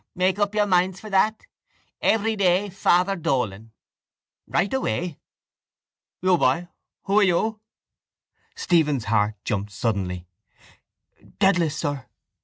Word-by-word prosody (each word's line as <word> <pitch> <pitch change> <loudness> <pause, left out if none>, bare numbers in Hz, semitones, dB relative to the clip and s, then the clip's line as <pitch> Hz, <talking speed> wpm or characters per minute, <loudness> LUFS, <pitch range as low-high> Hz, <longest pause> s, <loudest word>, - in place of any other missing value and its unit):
Make 185 +2 +1
up 205 0 0
your 210 -1 +3
minds 185 -1 +1
for 215 - -10
that. 215 +3 +2 0.6
Every 220 0 +2
day 195 0 +2
Father 185 +1 +2
Dolan. 115 - -2 0.8
Write 200 - 0
away. 180 - -2 1.0
You, 185 -2 +3
boy, 165 +7 +1 0.3
who 200 +2 +3
are - - +5
you? 210 +4 +1 1.0
Stephen's 150 -8 +1
heart 105 0 +1
jumped 105 0 -2
suddenly. 95 -5 -2 1.1
—Dedalus, 175 -6 +2
sir. 145 -4 -3
175 Hz, 110 wpm, -24 LUFS, 130-200 Hz, 1.1 s, are